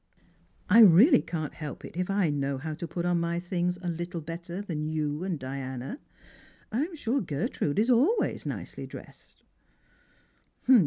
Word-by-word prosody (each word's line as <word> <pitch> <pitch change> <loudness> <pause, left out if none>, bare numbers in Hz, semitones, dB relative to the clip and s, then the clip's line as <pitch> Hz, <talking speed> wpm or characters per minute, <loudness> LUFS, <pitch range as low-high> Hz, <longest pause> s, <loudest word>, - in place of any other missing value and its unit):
"I 210 +3 +6
really 225 - +8
can't 155 -4 -4
help 150 -3 -7
it - - -10
if 180 +1 -2
I 195 -5 +2
know 140 -1 -1
how 155 +4 -4
to 165 +2 -5
put 170 +1 -3
on 175 -1 +2
my 170 0 -1
things 180 0 -1
a - - -3
little 175 +1 -3
better 170 +3 -6
than 160 -7 -3
you 155 0 -2
and 185 -3 -2
Diana. 130 - -5 0.7
I'm 300 +10 -1
sure 275 -2 0
Gertrude 145 -1 -2
is 225 +5 +3
always 295 - +2
nicely - - -6
dressed." - - -13
170 Hz, 155 wpm, -28 LUFS, 150-200 Hz, 0.7 s, really